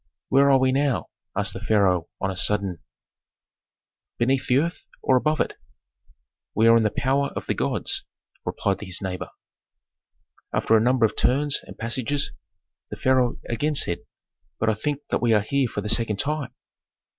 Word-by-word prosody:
"Where 140 +1 +5
are 135 - +6
we 130 0 +2
now?" 140 -2 0 0.3
asked - - 0
the - - -6
pharaoh 95 -5 +2
on 95 - -1
a - - -6
sudden, 95 -1 +1 1.4
"beneath 130 +3 +1
the 125 - +4
earth, 170 +5 -2 0.2
or 130 - +3
above 155 +4 +1
it?" - - 0 1.0
"We 110 - +3
are 115 - +7
in 115 - +5
the 110 - +2
power 135 +6 0
of - - -4
the - - 0
gods!" - - -1 0.4
replied 100 -1 -2
his 95 -3 -2
neighbor. 95 -1 -5 1.2
After 110 - +2
a 110 - +5
number 125 0 +3
of 110 - -1
turns 140 +2 +2
and - - -12
passages 130 +5 0 0.6
the - - -7
pharaoh 130 -2 +2
again 145 +6 -1
said, 85 -10 +3 0.6
"But 110 0 +2
I - - 0
think 145 +7 -3
that - - +1
we 120 -1 +3
are 105 - +4
here 135 +5 0
for 105 - -4
the 105 - -5
second 110 -1 +1
time." 140 0 -2
120 Hz, 170 wpm, -24 LUFS, 105-135 Hz, 1.4 s, are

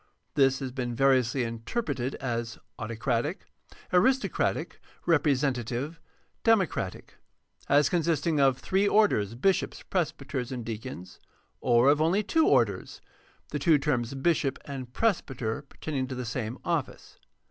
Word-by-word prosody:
This 135 -2 +4
has 130 -1 -3
been 125 -2 -3
variously 130 -1 +3
interpreted 125 - -3
as 115 -3 -3 0.2
autocratic, 115 - -2 0.5
aristocratic, 260 +9 +1 0.2
representative, 140 -2 +1 0.4
democratic; 195 - 0 0.5
as 145 0 +5
con 170 +3 +1
sisting 160 -1 +1
of 135 -2 +4
three 195 +7 +1
orders, 115 - +3
bishops, 190 +10 0
presbyters, 140 -7 -2
and 125 -3 -5
deacons, 110 -5 -7 0.4
or 120 +1 +4
of 145 +2 +5
only 180 +7 +2
two 320 +10 +2
orders, - - +1 0.5
the - - -3
two 165 -4 +5
terms, 135 -3 -1
bishop 140 -1 +1
and 130 -3 -6
presbyter, 135 - -1
pertaining 140 -1 -4
to 130 - -5
the 125 0 -4
same 120 +1 -3
office. 170 -6 -3
135 Hz, 125 wpm, -28 LUFS, 120-160 Hz, 0.5 s, as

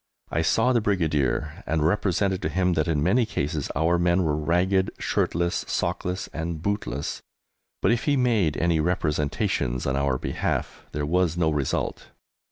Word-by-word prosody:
I 80 - +1
saw 115 +10 +3
the 120 - +3
Brigadier, 80 -3 0
and 80 -1 +1
represented 95 +1 +1
to - - -1
him 90 -1 +1
that 80 -2 0
in 75 -3 +1
many 100 +9 +3
cases 75 -8 -2
our 85 +4 +2
men 85 +1 +3
were 75 -3 +1
ragged, 90 +5 +1
shirtless, 85 +1 0
sockless, 90 +1 -2
and 80 0 -3
bootless, 95 -6 -3 0.6
but - - +4
if 115 - 0
he 145 -2 +3
made 110 - +2
any 85 -1 +2
representations 75 -6 0
on 65 - 0
our 70 -2 +1
behalf - - -3
there 75 0 -2
was 85 +1 +1
no 80 -2 +2
result. 75 -3 -2
85 Hz, 160 wpm, -25 LUFS, 75-95 Hz, 0.6 s, but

